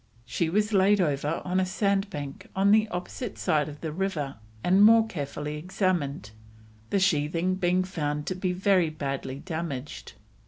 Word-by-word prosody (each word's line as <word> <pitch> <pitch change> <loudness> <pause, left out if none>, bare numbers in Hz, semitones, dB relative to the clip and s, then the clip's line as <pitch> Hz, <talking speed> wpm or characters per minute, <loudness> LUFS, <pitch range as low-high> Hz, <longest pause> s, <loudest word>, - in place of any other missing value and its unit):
She 160 +6 -1
was 210 +4 +1
laid 200 +1 +4
over 150 -2 0
on 185 +1 +1
a - - +3
sandbank 195 -8 -2
on 195 +1 +4
the 215 +1 +5
opposite 185 +5 -5
side 150 -1 +1
of 150 0 -11
the 160 - -3
river 155 - -3 0.3
and 190 +3 +5
more 225 +1 +7
carefully 150 -5 -5
examined, 155 - -1 0.6
the 200 - +2
sheathing 170 0 +1
being 185 0 +1
found 150 -5 -3
to - - -1
be 185 0 -2
very 185 -2 +2
badly 140 -3 -4
damaged. 155 -4 -5
180 Hz, 155 wpm, -27 LUFS, 150-195 Hz, 0.6 s, more